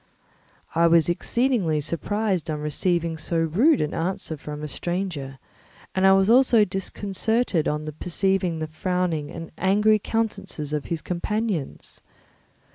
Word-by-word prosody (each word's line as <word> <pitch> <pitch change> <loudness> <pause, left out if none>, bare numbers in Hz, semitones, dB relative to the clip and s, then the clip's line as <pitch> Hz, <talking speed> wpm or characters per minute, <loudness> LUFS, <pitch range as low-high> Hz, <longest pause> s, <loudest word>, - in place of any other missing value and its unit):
I 170 +1 +4
was 165 -1 +4
exceedingly 200 - +1
surprised 185 +3 -1
on 155 -1 -2
receiving 165 +2 -1
so 170 - -2
rude 200 - +3
an 150 - -1
answer 165 -1 -2
from 150 0 -7
a - - -3
stranger, 160 -4 -4 0.6
and 190 0 +3
I 190 - +7
was 195 0 +4
also 235 -2 +5
disconcerted 195 0 -1
on 150 +1 -2
perceiving 185 -1 0
the 160 - -3
frowning 165 -1 -2
and 165 -1 -8
angry 210 +3 +3
countenances 195 -9 -3
of 150 -2 -2
his 165 -4 -4
companions. 195 -2 -3
175 Hz, 130 wpm, -24 LUFS, 155-200 Hz, 0.6 s, I